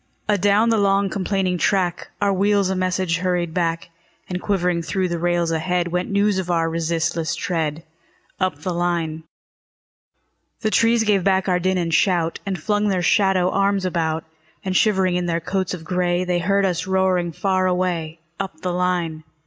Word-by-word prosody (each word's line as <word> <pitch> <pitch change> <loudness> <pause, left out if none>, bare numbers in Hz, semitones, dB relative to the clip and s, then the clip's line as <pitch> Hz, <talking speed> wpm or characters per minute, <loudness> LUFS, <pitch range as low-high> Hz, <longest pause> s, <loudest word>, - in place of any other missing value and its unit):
Adown 205 +2 +3
the 225 - +2
long, 195 0 +2
complaining 190 -2 -1
track, 180 -3 0
Our 200 -1 +2
wheels 200 0 +2
a - - -1
message 185 -2 0
hurried 175 -2 -1
back; 170 -1 -1 0.4
And 180 0 -4
quivering 180 -4 0
through 185 +2 -1
the 170 -1 -2
rails 175 -1 +1
ahead, 175 +2 0
Went 180 +1 -2
news 200 -1 +2
of 180 -1 -4
our 165 -1 +1
resistless 165 0 -1
tread, 160 -3 -2 0.6
Up 185 -6 -1
the 180 - -2
line. 170 -2 -2 1.4
The 215 -2 0
trees 230 +1 +3
gave 205 -4 +2
back 190 0 +2
our 180 -1 +2
din 185 +1 0
and 170 -2 -1
shout, 170 -1 +2
And 190 -3 -2
flung 210 +5 0
their 185 -3 0
shadow 190 -1 +3
arms 195 -1 +1
about; 165 -3 -1 0.4
And 185 -1 -1
shivering 190 -3 +3
in 180 0 -2
their 165 -1 0
coats 185 +2 -2
of 165 - -11
gray, 180 +1 0
They 180 -1 0
heard 195 +3 +2
us 180 -1 -1
roaring 190 -2 +1
far 185 +2 0
away, 175 -3 -1 0.2
Up 190 -5 -5
the 180 -1 -2
line. 175 -3 -1
180 Hz, 175 wpm, -21 LUFS, 170-195 Hz, 1.4 s, Adown